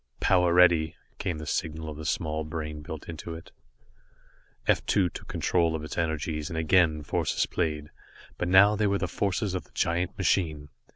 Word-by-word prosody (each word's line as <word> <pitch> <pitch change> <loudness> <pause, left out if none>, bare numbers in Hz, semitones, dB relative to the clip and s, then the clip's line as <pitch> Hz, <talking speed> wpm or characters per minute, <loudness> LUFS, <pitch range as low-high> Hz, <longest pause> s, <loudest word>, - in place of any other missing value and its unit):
"Power 90 -2 +3
ready," 85 -3 +4 0.2
came 85 -4 -2
the 75 - -7
signal 80 +1 -3
of 75 - -6
the 75 +1 -8
small 80 -1 -1
brain 75 -1 -5
built 75 0 -8
into 85 0 -6
it. 80 - -11 1.1
F - - +2
2 95 -3 +3
took - - -10
control 85 -2 +1
of 75 - -4
its 75 - -6
energies 80 -2 -2
and 80 - -5
again 80 -1 +3
forces - - 0
played, 75 -4 -2 0.5
but 90 - 0
now 100 +3 +6
they 105 0 +1
were 100 0 +2
the 95 - -2
forces 100 +1 -1
of 95 - -3
the - - -25
giant 90 +3 0
machine. 80 -6 0
80 Hz, 180 wpm, -27 LUFS, 75-90 Hz, 1.1 s, now